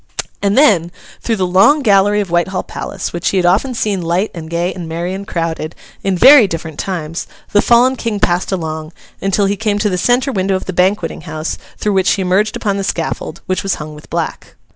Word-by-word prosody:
And 200 +2 +1
then, 190 - +4 0.3
through 230 - 0
the 190 -3 0
long 195 +12 +4
gallery 205 -1 +4
of 190 -4 -5
Whitehall 175 +2 0
Palace, 195 - -6
which 175 - -1
he 195 - 0
had 180 - +2
often 215 +9 +2
seen 205 -4 -1
light 175 +5 0
and 160 -2 -8
gay 170 +2 -1
and 170 -3 -7
merry 170 +3 -3
and 195 +1 -6
crowded, 165 -2 -3 0.3
in 195 -2 0
very 265 +2 +8
different 160 -3 -6
times, 165 -3 -4 0.2
the 205 - +4
fallen 245 +3 +4
King 230 -4 -3
passed 175 0 +1
along, 160 -3 -4 0.3
until 195 +1 +1
he 200 +1 +1
came 210 -1 -1
to 210 -1 0
the 180 - -1
centre 250 +5 +2
window 195 -3 0
of 185 - -3
the 185 - -4
Banqueting 180 -1 0
House, 155 +1 -3 0.2
through 210 - -1
which 190 -1 +2
he 195 - -1
emerged 195 +4 +1
upon 200 -2 -1
the 195 - -2
scaffold, 165 -2 -3
which 185 0 -1
was 195 - -1
hung 150 0 -8
with 150 - -14
black. - - -4
190 Hz, 215 wpm, -16 LUFS, 170-205 Hz, 0.3 s, very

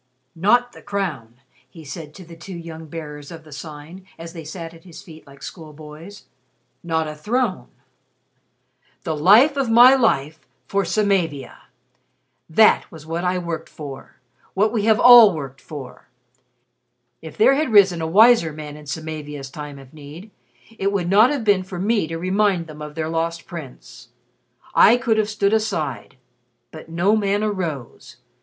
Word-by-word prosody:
"Not 240 +8 +2
the - - -15
crown!" 170 - -4 0.3
he 160 +3 -14
said 155 0 -9
to 185 - -12
the 170 0 -13
two 175 +3 -10
young 165 -1 -9
Bearers 150 -2 -9
of 165 -2 -11
the 155 - -17
Sign 155 +5 -10
as 165 0 -10
they 165 -2 -8
sat 165 +1 -8
at 165 - -17
his 175 -3 -13
feet 160 -3 -15
like 140 0 -16
schoolboys 155 +4 -11 0.6
"not 160 -2 -1
a 155 - -5
throne. 215 +6 -2 1.4
'The 160 -5 -2
Life 220 - +5
of 270 -4 0
my 240 +3 +8
life 160 - +1 0.3
for 200 0 -1
Samavia.' 180 - -1 0.8
That 215 +7 +4
was 160 -2 -12
what 165 +2 -4
I 180 0 0
worked 170 -3 -5
for 140 -3 -10 0.4
what 210 +3 +2
we 215 -3 0
have 220 0 +3
all 235 -6 +8
worked 135 -3 -8
for. 145 -4 -10 1.1
If 160 -2 -11
there 220 +5 +5
had 280 -2 -1
risen 190 -5 +5
a 160 - -2
wiser 210 -1 +5
man 150 -1 -9
in 150 -1 -13
Samavia's 150 -2 -6
time 150 -1 -8
of 135 0 -15
need, 155 +7 -12 0.5
it 195 +1 0
would 180 -4 -2
not 215 +5 +6
have 280 -4 -2
been 205 -3 +3
for 185 -1 -8
me 205 -1 0
to 165 +1 -5
remind 185 0 0
them 155 -1 -12
of 150 0 -8
their 160 -1 -3
Lost 165 +1 -3
Prince. 160 -8 -11 0.6
I 230 +4 +6
could 230 -3 0
have 215 -1 0
stood 205 -1 0
aside. 160 - -2 0.5
But 160 0 -12
no 175 +6 +1
man 205 -1 0
arose. 170 - -5
170 Hz, 165 wpm, -21 LUFS, 155-205 Hz, 1.4 s, my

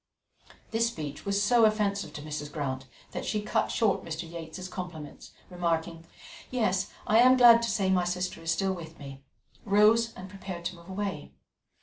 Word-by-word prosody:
This 230 +1 +2
speech 150 -7 -6
was 200 0 +1
so 235 +2 +4
offensive 205 -5 +1
to 150 - -7
Mrs. 150 -1 -5
Grant 135 -3 -4 0.2
that - - -4
she 215 - -1
cut 210 - 0
short 215 -4 +1
Mr. 165 +1 -5
Yates's 170 +2 -7
compliments, 175 -5 -8
and - - -28
remarking, 165 -1 -2 0.4
"Yes, 195 -6 0
I 220 +2 +4
am 255 +2 +7
glad 235 -2 +8
to 230 - -1
say 195 -2 +1
my 180 -1 +2
sister 180 -1 -3
is 165 - -5
still 190 +4 +1
with 165 -3 -9
me," 135 -1 -10 0.4
rose 220 +3 +4
and 185 - -8
prepared 190 -3 -8
to 180 - -3
move 170 +1 -15
away. 190 -5 -4
185 Hz, 180 wpm, -28 LUFS, 165-210 Hz, 0.4 s, glad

